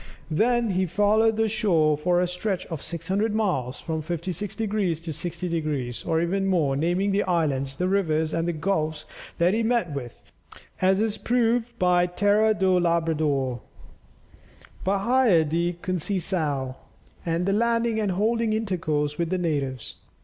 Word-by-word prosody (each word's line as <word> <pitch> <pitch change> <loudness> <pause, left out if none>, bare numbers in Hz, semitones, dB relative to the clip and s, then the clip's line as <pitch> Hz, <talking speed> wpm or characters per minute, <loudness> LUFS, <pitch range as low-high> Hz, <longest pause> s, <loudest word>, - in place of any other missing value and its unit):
Then 235 +6 +2
he 185 0 +1
followed 215 +4 +2
the 225 0 +2
shore 180 -9 +2
for 175 +4 +1
a 180 - +1
stretch 180 +2 -3
of 160 -4 -4
600 190 +6 -2
miles, 155 - -1
from 160 -2 -3
56 175 +5 -4
degrees 205 -7 -1
to 165 -2 -5
60 175 +4 -4
degrees, 150 -8 -2
or 160 -1 0
even 195 +3 0
more, 160 -8 +2
naming 175 +7 +1
the 200 +1 +2
islands, 145 -7 0
the 180 +5 -1
rivers, 160 -5 +1
and 165 +1 0
the - - +1
gulfs 155 -2 -2 0.3
that 175 +3 +3
he 225 - +1
met 225 -8 0
with, 125 -4 -7 0.6
as 190 +1 +3
is 215 -1 0
proved 240 0 0
by 180 -3 +3
Terra 205 +4 +2
do 190 -2 +3
Labrador, 155 -7 0 1.2
Bahia 200 -2 +3
de 170 +3 0
Conceiçao, 170 -6 -1
&c., - - -23 0.5
and 180 +5 0
landing 230 -1 +1
and 205 -3 0
holding 225 +3 +1
intercourse 160 -9 -1
with 170 -1 0
the 185 - 0
natives. 140 -8 -2
180 Hz, 150 wpm, -25 LUFS, 160-205 Hz, 1.2 s, that